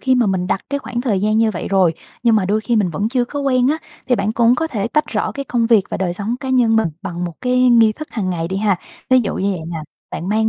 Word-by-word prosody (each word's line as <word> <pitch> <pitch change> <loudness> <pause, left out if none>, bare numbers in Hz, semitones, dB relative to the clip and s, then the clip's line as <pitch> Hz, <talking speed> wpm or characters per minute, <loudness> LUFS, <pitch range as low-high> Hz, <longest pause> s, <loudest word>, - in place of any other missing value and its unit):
khi 260 -1 +2
mà 240 -3 +3
mình 185 -2 0
đặt 195 - 0
cái 280 - 0
khoảng 240 -3 -4
thời 220 -7 0
gian 215 +1 +2
như 225 -1 +3
vậy 180 - -5
rồi, 185 -4 +3 0.3
nhưng 230 -2 +4
mà 195 - +1
đôi 210 +3 +1
khi 235 +1 0
mình 195 -5 +2
vẫn 200 +8 -1
chưa 250 0 +1
có 285 +3 -5
quen 255 -2 +2
á, 310 +2 +1 0.3
thì 250 - +3
bạn 205 +2 -1
cũng 235 +1 +4
có 320 +5 -1
thể 230 -6 -3
tách 300 +4 +1
rõ - - -2
cái 275 -1 -5
công 235 -3 0
việc 225 -5 +4
và - - -2
đời 180 -2 -1
sống 205 +5 -3
cá 265 - -5
nhân 240 -4 +3
mình 220 -6 +2
bằng 175 -2 -4
một 170 -2 -5
cái 250 0 +3
nghi 230 -2 +5
thức 310 +6 -8
hàng 195 -5 -2
ngày 165 -1 -2
đi 190 - -3
ha. 200 -2 +2 0.3
Ví 255 0 +6
dụ 215 - -2
như 200 +1 0
vậy 185 -4 -3
nè, 170 - -4 0.3
bạn 175 - -5
mang 220 +1 +2
220 Hz, 305 wpm, -19 LUFS, 195-250 Hz, 0.3 s, Ví